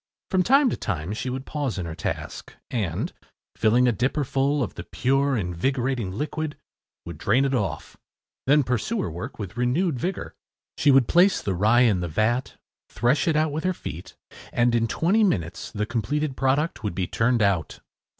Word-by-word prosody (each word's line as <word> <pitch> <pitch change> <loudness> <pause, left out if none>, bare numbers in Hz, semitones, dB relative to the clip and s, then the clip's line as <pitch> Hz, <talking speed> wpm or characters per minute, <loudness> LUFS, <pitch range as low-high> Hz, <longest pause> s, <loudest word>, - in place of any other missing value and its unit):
From 190 -1 +3
time 275 +8 +5
to - - -1
time 90 -2 -3
she 120 +4 -3
would 130 +1 -4
pause 145 -7 -3
in 90 - -3
her 80 - -5
task, - - -5 0.2
and, 100 -9 -2 0.4
filling 120 +3 +3
a - - +4
dipper 125 +7 0
full 140 +2 +1
of 110 - -4
the 85 - -7
pure, 135 +5 +1
invigorating 120 +4 -1
liquid, 150 +7 -3 0.5
would - - -8
drain 125 +7 +3
it 135 - 0
off 95 -10 -3 0.5
then 145 +1 +5
pursue 125 - -1
her - - -3
work 85 +3 -7
with 105 +1 -7
renewed 130 +4 +1
vigor. 185 +8 -3 0.4
She 145 - +2
would 135 -3 +5
place 185 +4 +4
the 100 - -2
rye 110 +7 +4
in 110 -7 +4
the 90 - -2
vat, 110 - 0 0.3
thresh 120 - +1
it 160 - +2
out 155 0 +2
with 155 +2 -3
her 185 0 +1
feet 85 - -8 0.4
and, 120 0 +2
in 115 -1 +2
twenty 190 - +2
minutes, 90 - -1
the 105 0 -2
completed 130 +6 -2
product 135 0 0
would 105 -5 -2
be 95 - 0
turned 115 +3 +1
out. 95 -6 0
125 Hz, 185 wpm, -25 LUFS, 105-145 Hz, 0.5 s, time